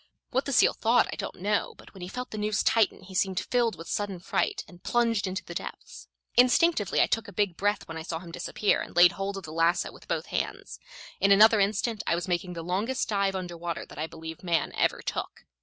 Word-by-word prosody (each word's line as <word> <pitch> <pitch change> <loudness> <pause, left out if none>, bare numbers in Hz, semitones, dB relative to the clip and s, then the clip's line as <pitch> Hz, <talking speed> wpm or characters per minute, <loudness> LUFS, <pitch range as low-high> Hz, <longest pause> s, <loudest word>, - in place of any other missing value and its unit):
What 260 +2 0
the 280 - -3
seal 250 - +5
thought 235 +2 +3
I - - -4
don't - - -6
know, 205 +3 0
but - - -16
when 190 - -12
he 180 - -5
felt 250 +6 -6
the 215 - -5
noose 210 0 0
tighten 225 -3 +2
he 190 +1 -12
seemed 190 0 +1
filled 240 -4 0
with 165 - -9
sudden 205 -2 -2
fright, 405 - -1
and 175 -1 -16
plunged 230 -4 +1
into 190 +4 -4
the - - -7
depths. - - -8 0.3
Instinctively 250 - +4
I - - +6
took 225 0 -1
a - - -9
big 200 -4 0
breath 205 +3 0
when 165 - -6
I - - -5
saw 165 0 -4
him 170 0 -10
disappear, 200 +4 0
and - - -8
laid 175 0 +8
hold 195 +1 -4
of 195 - -7
the 155 - -8
lasso 165 +2 +2
with - - -16
both - - -2
hands. - - -3 0.4
In 200 - +3
another 215 +2 +7
instant 210 +2 0
I 170 - +3
was 175 +2 -3
making 180 0 -1
the 165 -1 -6
longest 205 +9 -1
dive 200 -2 +1
under 180 -2 -4
water 170 0 -4
that - - -12
I 155 - -2
believe 160 0 -9
man 170 -2 0
ever - - 0
took. - - -5
195 Hz, 240 wpm, -28 LUFS, 175-220 Hz, 0.4 s, laid